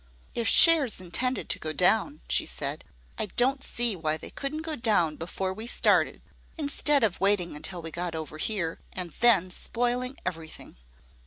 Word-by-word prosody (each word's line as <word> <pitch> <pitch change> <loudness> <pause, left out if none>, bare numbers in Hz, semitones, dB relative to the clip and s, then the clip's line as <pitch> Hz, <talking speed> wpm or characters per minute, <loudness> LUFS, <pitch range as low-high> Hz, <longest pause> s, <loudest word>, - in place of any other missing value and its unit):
"If 235 - -1
shares 315 - +6
intended 245 +8 -2
to - - 0
go 155 0 -4
down," 220 - +2
she - - +1
said, - - -4 0.3
"I 215 - -1
don't 265 +7 +1
see 235 -3 +1
why 155 -2 -1
they - - -9
couldn't 305 +3 -5
go 320 -1 -3
down 205 - +1
before 185 +4 -4
we 220 +4 -7
started, - - +1 0.3
instead 295 -2 +1
of 200 -5 0
waiting 195 -5 +2
until 175 +3 -4
we 165 - -6
got 175 0 -4
over 155 -1 -7
here, 170 -4 -2
and 180 -2 -4
then 200 -7 +4
spoiling 245 +6 -2
every 165 -3 -4
thing." - - -13
205 Hz, 170 wpm, -27 LUFS, 170-250 Hz, 0.3 s, shares